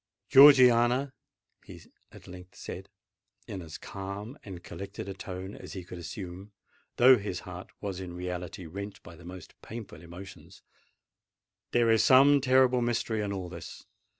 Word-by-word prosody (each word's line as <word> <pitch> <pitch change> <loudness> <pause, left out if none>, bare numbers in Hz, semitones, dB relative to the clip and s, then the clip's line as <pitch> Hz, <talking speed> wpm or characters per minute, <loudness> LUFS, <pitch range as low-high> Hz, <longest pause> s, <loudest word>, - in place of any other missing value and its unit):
"Georgiana," 130 -1 +7 0.5
he - - -12 0.3
at - - -15
length 90 0 -12
said, - - -8 0.6
in 95 - -6
as 80 -2 -9
calm 100 +5 -7
and 95 -6 -9
collected 100 +3 -8
a 100 - -5
tone 95 0 -7
as - - -10
he 95 - -6
could 90 0 -9
assume, 90 +4 -8 0.4
though 125 0 +7
his 95 -3 -5
heart 90 0 -9
was 100 -3 -4
in 90 -2 -7
reality 90 0 -6
rent 100 +5 -8
by 85 - -12
the 85 - -16
most 90 -1 -10
painful 110 -8 -9
emotions, 90 +3 -12 1.1
"there 120 -1 +3
is 110 -2 +4
some 140 +2 +6
terrible 130 -1 +4
mystery 115 -2 -1
in 100 -1 -3
all 95 -2 -4
this! 85 -1 -10
100 Hz, 150 wpm, -29 LUFS, 90-120 Hz, 1.1 s, Georgiana